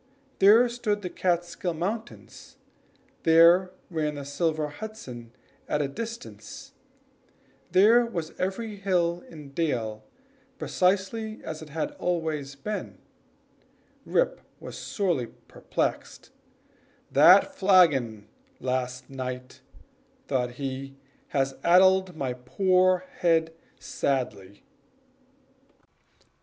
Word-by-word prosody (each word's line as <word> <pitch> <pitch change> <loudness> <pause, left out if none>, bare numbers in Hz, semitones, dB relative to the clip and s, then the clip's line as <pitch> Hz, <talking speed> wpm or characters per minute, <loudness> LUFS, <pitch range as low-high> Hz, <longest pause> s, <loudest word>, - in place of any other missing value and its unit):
There 215 +5 +7
stood 220 -4 -2
the 180 - -4
Kaatskill 175 0 -1
Mountains 215 +7 -6 0.6
there 170 +3 +6 0.2
ran 155 -2 -1
the 140 -1 -6
silver 155 +1 -1
Hudson 145 - -9 0.4
at 150 - 0
a 145 - 0
distance 230 - -8 1.0
there 220 +6 +6
was 170 -9 -5
every 205 +3 -3
hill 175 -3 0
and 150 -4 -12
dale 115 -9 -2 0.5
precisely 200 +4 0
as 155 0 -6
it 155 - -10
had 165 - -3
always 155 -5 -2
been 210 +10 -5 1.1
Rip - - 0 0.2
was - - -9
sorely 175 - -1 0.2
perplexed - - -4 0.8
"That - - +7
flagon 140 - +3 0.3
last 125 0 -3
night," 130 -1 -7 0.7
thought 125 -3 -1
he, 135 +1 -5 0.3
"has 135 -2 -1
addled 185 +1 +5
my 135 -5 -2
poor 185 +8 +2
head 165 -2 +2 0.3
sadly!" 105 -8 -3
165 Hz, 95 wpm, -27 LUFS, 135-190 Hz, 1.1 s, There